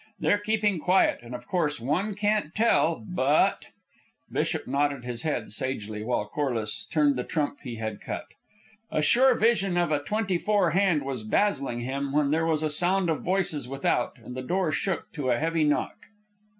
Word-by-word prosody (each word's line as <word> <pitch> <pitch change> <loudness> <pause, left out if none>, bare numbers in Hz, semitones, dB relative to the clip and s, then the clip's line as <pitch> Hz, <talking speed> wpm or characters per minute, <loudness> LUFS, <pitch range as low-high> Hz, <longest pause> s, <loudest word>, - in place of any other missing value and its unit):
They're 205 - +2
keeping 210 -3 0
quiet, 185 +4 +3
and 120 +1 -8
of 120 0 -9
course 155 -7 0
one 175 - -1
can't 205 -5 0
tell, 170 - +2
but.. 145 -3 +2 0.3
." - - -37
Bishop - - -1
nodded 140 -1 -1
his 120 -2 -4
head 125 -9 -2
sagely, 110 -4 -2
while 115 -2 -1
Corliss 120 -3 -3
turned 145 -3 +2
the 125 - -1
trump 145 0 -2
he 125 -4 -6
had 110 -2 -5
cut. - - -5 0.6
A 155 - 0
sure 250 - +5
vision 200 -5 +2
of 175 -3 +1
a 145 -1 +1
"twenty 195 +2 -1
four" 205 -5 +2
hand 175 -4 +2
was 135 -4 -4
dazzling 135 - 0
him, 135 +2 -3
when 145 -1 +2
there 165 +1 +1
was 160 -1 +1
a 155 - +1
sound 175 +3 +3
of 155 - -2
voices 175 -7 0
without 135 -2 -1
and 125 - -10
the 130 - -4
door 175 +4 0
shook 190 +4 -2
to 145 -5 -2
a 120 - +3
heavy 165 +3 0
knock. 150 -1 0
150 Hz, 185 wpm, -27 LUFS, 130-185 Hz, 0.6 s, sure